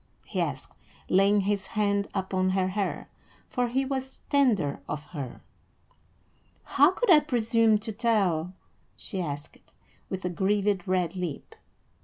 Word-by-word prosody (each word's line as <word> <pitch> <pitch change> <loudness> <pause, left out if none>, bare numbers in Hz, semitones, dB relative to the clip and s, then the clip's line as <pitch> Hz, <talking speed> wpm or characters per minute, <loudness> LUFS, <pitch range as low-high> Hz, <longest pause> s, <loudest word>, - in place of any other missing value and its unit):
he - - -2
asked, - - -4 0.3
laying 200 +2 +4
his 195 -1 -1
hand 200 -1 0
upon 190 -1 0
her 185 0 +1
hair, 200 +1 -2 0.4
for 250 -2 0
he 265 +3 0
was 265 0 -4
tender 220 - +2
of 150 0 -3
her. 145 -5 -7 1.2
"How - - +5
could 485 -6 +1
I 310 - +9
presume 230 -6 +2
to 215 +1 -5
tell?" 195 -7 +1 0.5
she 195 -5 -4
asked, 145 -2 -6 0.5
with 190 -1 -4
a - - +1
grieved 200 +1 +1
red 185 -1 0
lip. 180 -5 -5
200 Hz, 135 wpm, -27 LUFS, 185-225 Hz, 1.2 s, I